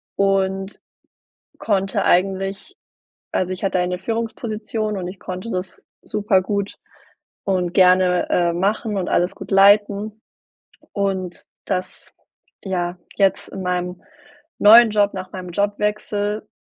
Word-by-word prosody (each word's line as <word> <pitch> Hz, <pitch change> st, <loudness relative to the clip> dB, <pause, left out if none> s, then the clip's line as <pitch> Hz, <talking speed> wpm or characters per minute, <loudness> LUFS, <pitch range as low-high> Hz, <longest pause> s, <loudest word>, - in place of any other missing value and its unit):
und 195 Hz, 0 st, 0 dB, 0.8 s
konnte 195 Hz, -2 st, 0 dB
eigentlich 195 Hz, -, 0 dB, 0.6 s
also, 185 Hz, 0 st, 0 dB
ich 185 Hz, +2 st, -6 dB
hatte 190 Hz, -1 st, +1 dB
eine 180 Hz, 0 st, -1 dB
Führungsposition 220 Hz, 0 st, -3 dB
und 180 Hz, -1 st, -4 dB
ich 185 Hz, 0 st, -9 dB
konnte 185 Hz, +5 st, -6 dB
das 185 Hz, -2 st, -5 dB, 0.2 s
super-gut 200 Hz, -1 st, 0 dB, 0.7 s
und 180 Hz, -3 st, 0 dB
gerne, 185 Hz, -1 st, +4 dB
äh, 175 Hz, -1 st, +2 dB
machen 205 Hz, +4 st, -1 dB
und 180 Hz, -, -2 dB
alles 175 Hz, +1 st, +1 dB
gut -, -, -10 dB
leiten. 205 Hz, +2 st, +4 dB, 0.7 s
Und 190 Hz, -3 st, -2 dB, 0.2 s
das 185 Hz, -1 st, -4 dB, 0.5 s
ja, 180 Hz, -2 st, -2 dB, 0.2 s
jetzt 195 Hz, -1 st, +2 dB
in 190 Hz, -, -7 dB
meinem 180 Hz, 0 st, -3 dB, 0.6 s
neuen 225 Hz, +2 st, +8 dB
Job, 205 Hz, -1 st, +2 dB
nach 185 Hz, -1 st, -7 dB
meinem 185 Hz, -1 st, -7 dB
Jobwechsel, 210 Hz, +1 st, -1 dB
195 Hz, 115 wpm, -21 LUFS, 185-205 Hz, 0.8 s, neuen